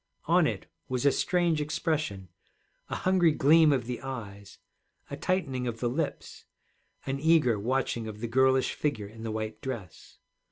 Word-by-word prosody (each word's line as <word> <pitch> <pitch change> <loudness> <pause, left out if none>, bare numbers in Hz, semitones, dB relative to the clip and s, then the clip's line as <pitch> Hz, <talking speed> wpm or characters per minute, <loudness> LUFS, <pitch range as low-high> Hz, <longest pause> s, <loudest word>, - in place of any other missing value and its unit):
On - - +4
it - - -4 0.2
was 130 +1 -1
a 140 - +6
strange 170 0 +1
expression, 150 - -2 0.6
a - - -2
hungry 185 -3 +3
gleam 155 +2 +5
of 130 -4 0
the 125 0 -5
eyes, 100 -7 -8 0.5
a - - -3
tightening 135 -9 -1
of 115 -1 -4
the 120 - 0
lips, 150 +2 -4 0.6
an 135 0 -2
eager 150 -8 +3
watching 120 0 -1
of 105 -1 -7
the 120 - -3
girlish 130 +2 +3
figure 140 -9 -2
in 110 +2 -12
the 115 - -4
white 110 0 -4
dress. 115 -11 -7
130 Hz, 160 wpm, -28 LUFS, 110-150 Hz, 0.6 s, a